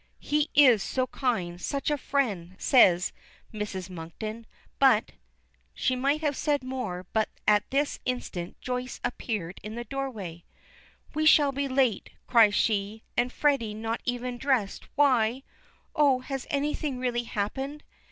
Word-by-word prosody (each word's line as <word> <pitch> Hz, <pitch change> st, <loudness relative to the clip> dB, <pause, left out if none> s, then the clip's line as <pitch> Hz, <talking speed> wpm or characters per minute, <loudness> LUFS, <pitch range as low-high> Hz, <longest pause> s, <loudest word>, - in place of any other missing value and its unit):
"He 300 Hz, +1 st, 0 dB
is 255 Hz, -8 st, +7 dB
so 255 Hz, +4 st, -1 dB
kind, 185 Hz, -11 st, -2 dB
such 280 Hz, +7 st, -1 dB
a -, -, +3 dB
friend," 200 Hz, -12 st, -1 dB
says 185 Hz, -9 st, +4 dB, 0.4 s
Mrs. 200 Hz, -4 st, -4 dB
Monkton. 200 Hz, +6 st, -7 dB, 0.3 s
"But 260 Hz, -6 st, +4 dB, 0.3 s
" -, -, -41 dB, 0.3 s
She 255 Hz, -, +1 dB
might 280 Hz, +4 st, +1 dB
have 295 Hz, -2 st, 0 dB
said 290 Hz, -2 st, 0 dB
more, 245 Hz, -9 st, -4 dB
but 220 Hz, -1 st, +1 dB, 0.2 s
at 210 Hz, -1 st, +4 dB
this 285 Hz, +2 st, 0 dB
instant 190 Hz, -9 st, -4 dB
Joyce 250 Hz, 0 st, -4 dB
appears 215 Hz, -7 st, -3 dB
in 215 Hz, +2 st, -7 dB
the 240 Hz, -, -4 dB
doorway. 220 Hz, -10 st, -5 dB, 0.7 s
"We 310 Hz, +1 st, +2 dB
shall 290 Hz, -2 st, +6 dB
be 280 Hz, +1 st, -2 dB
late," 260 Hz, -5 st, +1 dB, 0.2 s
cries 225 Hz, -4 st, +5 dB
she, 210 Hz, 0 st, 0 dB
"and 245 Hz, +1 st, +1 dB
Freddy 270 Hz, -9 st, +1 dB
not 225 Hz, +1 st, -3 dB
even 245 Hz, 0 st, -3 dB
dressed, 255 Hz, -8 st, 0 dB
why 255 Hz, -3 st, +3 dB, 0.5 s
Oh, 275 Hz, -4 st, +4 dB
has 270 Hz, 0 st, -5 dB
anything 290 Hz, -2 st, -1 dB
really 245 Hz, -1 st, -1 dB
happened?" 265 Hz, +8 st, -3 dB
245 Hz, 140 wpm, -27 LUFS, 210-275 Hz, 0.7 s, is